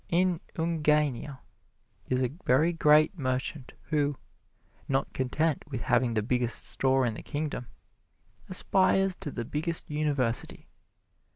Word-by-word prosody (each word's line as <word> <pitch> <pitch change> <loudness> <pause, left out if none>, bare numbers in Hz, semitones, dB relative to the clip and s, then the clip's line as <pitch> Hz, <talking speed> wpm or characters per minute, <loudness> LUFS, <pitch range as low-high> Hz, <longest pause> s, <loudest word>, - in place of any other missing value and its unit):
In 180 0 +2
Ungania 150 -5 0 0.7
is 130 0 +1
a 125 +1 -1
very 155 +7 +3
great 155 +2 +4
merchant 130 +1 -3 0.2
who, 145 -2 +1 0.7
not 135 0 -1
content 150 +4 0
with 130 -5 -4
having 120 -1 +1
the 110 - +1
biggest 120 0 -1
store 130 -1 +2
in 115 - 0
the - - -8
Kingdom, 145 -5 -4 0.8
aspires 190 0 +3
to - - -5
the 120 -4 -5
biggest 160 +5 -2
University. 145 -6 -1
145 Hz, 120 wpm, -28 LUFS, 130-160 Hz, 0.8 s, great